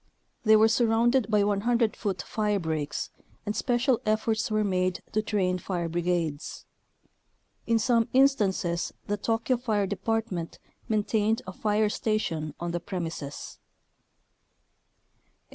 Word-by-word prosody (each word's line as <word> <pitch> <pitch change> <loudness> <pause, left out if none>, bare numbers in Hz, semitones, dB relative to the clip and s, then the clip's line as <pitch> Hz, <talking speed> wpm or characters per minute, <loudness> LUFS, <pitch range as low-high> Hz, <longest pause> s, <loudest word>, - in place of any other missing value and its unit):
They 220 -1 +6
were 215 +1 +6
surrounded 230 +2 +2
by 210 -2 +3
100 220 +3 +1
foot 190 -5 -3
firebreaks, 160 -9 -2 0.3
and 210 0 -2
special 245 0 +1
efforts 215 0 0
were 215 0 +1
made 185 -2 0
to 215 - +1
train 190 -4 0
fire 175 -2 -3
brigades. 170 -3 -2 1.0
In 230 - +3
some 230 0 +2
instances 205 -10 +2
the 205 - -1
Tokyo 230 +4 0
fire 220 -5 0
department 200 -3 -2 0.3
maintained 215 0 +1
a 185 - -7
fire 210 +2 +1
station 180 -9 -2
on 175 0 -3
the 175 - -2
premises. 165 -5 -6
210 Hz, 115 wpm, -27 LUFS, 180-225 Hz, 1.0 s, They